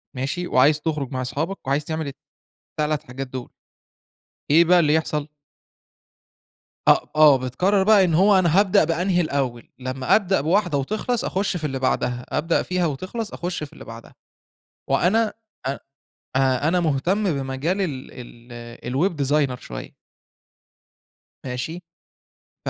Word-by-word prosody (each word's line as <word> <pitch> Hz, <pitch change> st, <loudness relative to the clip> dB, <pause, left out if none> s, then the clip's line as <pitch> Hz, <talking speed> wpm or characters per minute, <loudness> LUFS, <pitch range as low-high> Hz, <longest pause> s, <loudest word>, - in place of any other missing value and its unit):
ماشي؟ 140 Hz, +8 st, -3 dB
وعايز 145 Hz, +3 st, +4 dB
تخرج 150 Hz, -5 st, -2 dB
مع 130 Hz, -1 st, -2 dB
أصحابك، 155 Hz, +8 st, -4 dB
وعايز 140 Hz, +2 st, 0 dB
تعمل 160 Hz, -1 st, -3 dB, 0.7 s
ال3 150 Hz, -1 st, 0 dB
حاجات 130 Hz, +2 st, -7 dB
دول. 125 Hz, -1 st, -7 dB, 1.0 s
إيه 165 Hz, +4 st, +6 dB
بقى 175 Hz, +1 st, +5 dB
اللي 150 Hz, -2 st, +3 dB
يحصل؟ 150 Hz, -2 st, -1 dB, 1.6 s
أ -, -, +9 dB, 0.2 s
آه. 150 Hz, -3 st, +7 dB
بتقرّر 180 Hz, +11 st, +1 dB
بقى 210 Hz, -1 st, +6 dB
إن 175 Hz, -3 st, +1 dB
هو 190 Hz, +4 st, +5 dB
أنا 175 Hz, 0 st, +3 dB
هابدأ 195 Hz, -4 st, +4 dB
بأنهي 175 Hz, +3 st, +1 dB
الأول؟ 135 Hz, -7 st, -2 dB
لمّا 130 Hz, 0 st, +1 dB
أبدأ 195 Hz, -5 st, +2 dB
بواحدة 175 Hz, 0 st, +1 dB
وتخلص 215 Hz, -, -2 dB
أخُش 195 Hz, 0 st, -1 dB
في 160 Hz, -, -8 dB
اللي 135 Hz, -2 st, -2 dB
بعدها، 125 Hz, -1 st, -1 dB
أبدأ 165 Hz, +2 st, +1 dB
فيها 180 Hz, -1 st, -1 dB
وتخلص 185 Hz, -, -4 dB
أخُش 175 Hz, -2 st, -4 dB
في 145 Hz, -, -9 dB
اللي -, -, -12 dB
بعدها. 115 Hz, 0 st, -11 dB, 0.7 s
وأنا 210 Hz, +11 st, +2 dB, 0.3 s
أ 135 Hz, -, 0 dB, 0.7 s
أ 135 Hz, +2 st, +2 dB
أنا 180 Hz, +1 st, +2 dB
مهتم 170 Hz, +6 st, 0 dB
بمجال 135 Hz, +7 st, -2 dB
ال 145 Hz, -9 st, -3 dB, 0.7 s
ال 120 Hz, -, -5 dB
الweb 195 Hz, -, +1 dB
designer 135 Hz, -3 st, +1 dB
شوية. -, -, -8 dB, 1.5 s
ماشي؟ 130 Hz, +8 st, -4 dB, 0.9 s
ف -, -, +2 dB
155 Hz, 140 wpm, -23 LUFS, 135-180 Hz, 1.6 s, أ